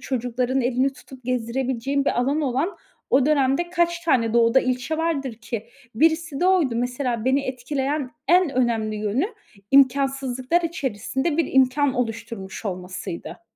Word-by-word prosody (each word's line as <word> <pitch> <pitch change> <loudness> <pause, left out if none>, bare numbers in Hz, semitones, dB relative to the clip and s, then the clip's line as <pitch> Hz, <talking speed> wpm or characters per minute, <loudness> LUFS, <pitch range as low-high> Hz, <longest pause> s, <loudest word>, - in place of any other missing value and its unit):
çocukların 250 +1 -1
elini 255 +2 +1
tutup 260 -2 -14
gezdirebileceğin 255 +2 -1
bir 245 - +1
alanı 280 +4 0
olan 275 +10 -1 0.4
o 265 0 +5
dönemde 295 +3 +2
kaç 345 -1 +1
tane 245 -9 +2
Doğu'da 235 +2 +5
ilçe 255 +5 -1
vardır 280 -7 -1
ki? 230 0 -6 0.3
Birisi 320 +2 +1
de 360 - +3
oydu. 340 -11 +3
Mesela 245 -1 -2
beni 265 +2 +3
etkileyen 270 +2 -2 0.2
en 355 -2 +5
önemli 230 -4 0
yönü 215 - 0 0.4
imkânsızlıklar 270 +2 +3
içerisinde 280 0 -2
bir 330 - 0
imkân 265 +1 +3
oluşturmuş 225 -4 -4
olmasıydı. 180 +1 -6
260 Hz, 135 wpm, -23 LUFS, 240-285 Hz, 0.4 s, o